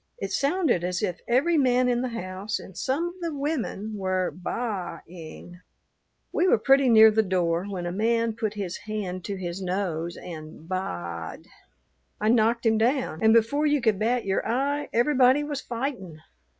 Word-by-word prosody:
It - - -5
sounded 290 - +1
as 180 +3 -2
if 180 -4 -2
every 300 +7 +3
man 250 -2 +3
in 245 -1 +1
the 255 - -1
house 185 +3 -4
and 190 - -12
some 295 - -1
of - - -10
the 335 -3 -3
women 265 -7 -3
were 185 -1 -1
baa 185 -2 -4
ing. 175 +1 -11 0.7
"We 365 - +2
were - - +5
pretty 270 +3 +4
near 220 -1 +8
the 220 +1 +3
door 180 -3 0
when 180 -3 -4
a 175 - -2
man 230 +3 +1
put 215 -2 -3
his 190 -4 -4
hand 185 -4 -4
to 200 - -3
his 180 0 -5
nose 180 -3 -2
and 160 -1 -9
baa 85 - -4
ed. - - -15 0.7
I 215 - +1
knocked 235 +1 +3
him 220 -1 +3
down, 245 - 0
and 220 - +5
before 230 +7 +3
you 295 0 +2
could 220 -6 +1
bat 235 +3 0
your 195 0 0
eye 280 +5 -1
everybody 260 +2 +4
was 290 -2 -4
fightin'. 230 - -5
220 Hz, 175 wpm, -26 LUFS, 185-255 Hz, 0.7 s, near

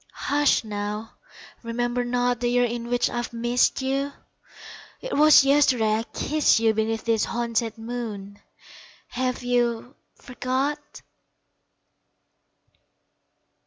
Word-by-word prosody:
Hush 290 -2 +1 1.0
remember 240 +1 -2
not 245 0 0
The 240 - -1
years 245 -1 +2
in 235 0 -5
which 245 0 +1
I've 240 0 -4
missed 240 +3 +1
you 275 +2 -1 1.0
'Twas 305 - +6
yesterday 255 -6 +3
I - - -3
kissed 305 0 +2
you 225 -1 +2
Beneath 220 +1 -2
this 225 -2 +1
haunted 230 -1 -2
moon! 220 -4 -6 0.7
Have 255 0 -3
you 245 +1 -1 0.2
forgot? 270 +4 -4
245 Hz, 95 wpm, -24 LUFS, 230-260 Hz, 1.0 s, Twas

